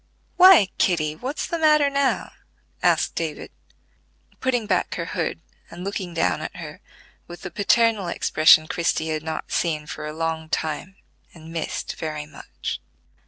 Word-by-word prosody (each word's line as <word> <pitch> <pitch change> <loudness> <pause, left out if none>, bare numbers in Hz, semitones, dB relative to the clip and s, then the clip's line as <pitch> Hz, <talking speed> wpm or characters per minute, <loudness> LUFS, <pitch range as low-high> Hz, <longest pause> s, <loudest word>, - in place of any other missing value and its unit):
"Why, 360 - +8
Kitty, 155 -4 +1
what's 260 - -4
the 335 - -3
matter 305 -2 +5
now?" 280 -1 0 0.5
asked - - +2
David, - - -4 0.9
putting 245 -4 0
back 190 -3 0
her 170 - -3
hood, 165 -1 -3 0.3
and 175 +1 -9
looking 190 -3 -4
down - - +1
at - - -6
her - - -9 0.5
with 175 0 -11
the 180 - -6
paternal 215 -1 +2
expression 155 -2 +5
Christie 160 -1 -1
had 155 -1 -2
not 160 0 -5
seen 155 -3 0
for 150 - -6
a - - -4
long 160 0 -3
time, 160 +5 -3 0.4
and 165 0 -12
missed 165 - -4
very 150 -1 -4
much. 150 -1 -7
170 Hz, 150 wpm, -23 LUFS, 155-225 Hz, 0.9 s, Why